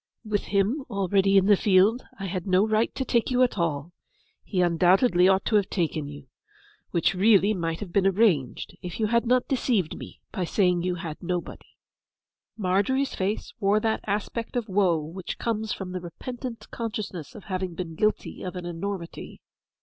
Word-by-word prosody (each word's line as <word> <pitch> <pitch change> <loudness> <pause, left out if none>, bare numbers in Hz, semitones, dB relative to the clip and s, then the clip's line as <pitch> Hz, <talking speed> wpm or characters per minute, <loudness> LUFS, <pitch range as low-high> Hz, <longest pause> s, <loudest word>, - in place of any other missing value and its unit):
With 210 -1 -1
him 205 +8 +1
already 195 -1 +2
in 190 - +5
the 205 0 +6
field 200 +5 +3
I 195 - -5
had 185 0 -4
no 190 +3 +4
right 220 +1 +2
to 265 - -2
take 235 -3 +1
you 255 0 +3
at 240 -5 0
all; 160 -1 -1 0.5
he 190 - -3
undoubtedly 180 +3 +4
ought 190 0 +3
to 215 - +3
have 200 -2 0
taken 160 -5 -1
you; 145 -1 -10 0.6
which 170 +1 +1
really 200 +1 +4
might 165 -4 -3
have 185 -4 -7
been 195 -1 +3
arranged, 190 - +1
if 180 +1 -6
you 220 - +2
had 235 +2 +1
not 250 +1 +3
deceived 235 - 0
me - - -10
by 190 - -2
saying 180 0 +2
you 180 0 -1
had 165 -4 -6
nobody.' 175 0 -5 0.8
Margery's 205 +8 +1
face 195 +3 -2
wore 205 0 +3
that 220 0 0
aspect 210 +4 -3
of 240 -2 -1
woe 190 -4 +3
which 170 +4 -6
comes 220 -2 -2
from 190 -2 -4
the 185 -1 -4
repentant 240 +7 -7
consciousness 210 -8 -5
of 210 - -10
having 185 -2 -3
been 170 -2 -5
guilty 215 +6 -1
of 185 0 -5
an 180 -1 -5
enormity. 175 +1 -5
195 Hz, 180 wpm, -26 LUFS, 180-215 Hz, 0.8 s, the